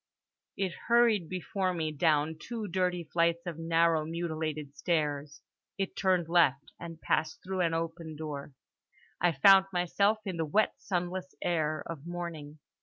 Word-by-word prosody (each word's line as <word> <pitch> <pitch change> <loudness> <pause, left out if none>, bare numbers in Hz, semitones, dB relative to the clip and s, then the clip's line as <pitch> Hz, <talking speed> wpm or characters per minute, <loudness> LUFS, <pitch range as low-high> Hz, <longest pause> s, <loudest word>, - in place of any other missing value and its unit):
It 190 -2 0 0.2
hurried 235 -7 +4
before 185 0 -2
me 160 -2 -1
down 155 0 +1
two 225 -3 -5
dirty 180 -1 0
flights 170 0 +2
of 170 -2 -5
narrow 165 -1 +2
mutilated 155 -3 -4
stairs. 150 -4 -1 0.3
It 195 -1 -3
turned 185 -3 +1
left, 165 -5 +3
and 165 -1 -8
passed 160 -1 -1
through 190 0 -2
an 165 -2 +1
open 165 -1 -4
door. 150 -2 -6 0.7
I 175 0 +4
found 190 +6 +6
myself 200 +4 +2
in 185 -3 -3
the 165 - 0
wet 215 +8 +2
sunless 185 0 -3
air 155 -3 0
of 165 -1 -7
morning. 170 -4 -6
170 Hz, 145 wpm, -30 LUFS, 155-185 Hz, 0.7 s, found